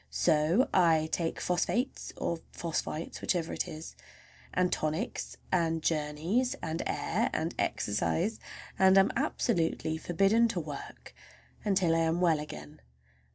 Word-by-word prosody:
So 165 - +3
I 165 -4 +4
take 165 -2 -1
phosphates 230 +9 -1
or 170 - -2
phosphites—whichever 165 +1 -2
it - - -2
is, 155 +1 -8 0.6
and 180 0 +1
tonics, 155 +10 -2
and 165 -3 +1
journeys, 160 +11 0
and 160 0 -3
air, - - 0
and - - -1
exercise, 170 - 0 0.4
and 190 0 +6
am 195 - +5
absolutely 160 -1 0
forbidden 195 +8 +3
to 230 - -2
"work" - - -8 0.5
until 190 -5 +2
I - - +2
am 165 +1 +1
well 170 -4 +3
again. 75 - -9
165 Hz, 120 wpm, -30 LUFS, 160-190 Hz, 0.6 s, and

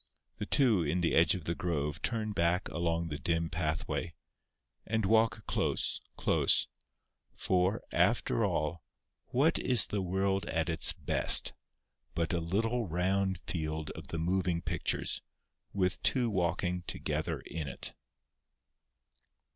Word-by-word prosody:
The - - -4
two 120 -9 +3
in 85 +3 -1
the 85 - +1
edge 80 +4 +4
of 90 -5 -7
the 85 - 0
grove 75 -3 -3
turn 110 -2 -2
back 90 -1 +1
along 85 -1 -1
the 75 0 -5
dim 85 -1 -1
pathway, 80 +1 -2 0.7
and 110 -1 -1
walk 110 +2 +2
close, - - 0 0.2
close—for, 95 +4 -1
after - - +1
all, 75 +2 -1 0.4
what 150 +6 +1
is 125 -7 +5
the 105 - -3
world 95 +1 -1
at 80 +1 -1
its 80 -2 +4
best - - +5 0.6
but 85 +1 -1
a 85 - +1
little 110 +7 -1
round 95 +2 0
field 80 -2 -3
of - - -10
the 85 - -4
moving 85 0 -1
pictures - - -1 0.5
with 95 -2 -1
two 125 -4 +1
walking 90 -1 -1
together - - -3
in 80 -3 -6
it? 70 - -3
90 Hz, 130 wpm, -31 LUFS, 80-100 Hz, 0.7 s, is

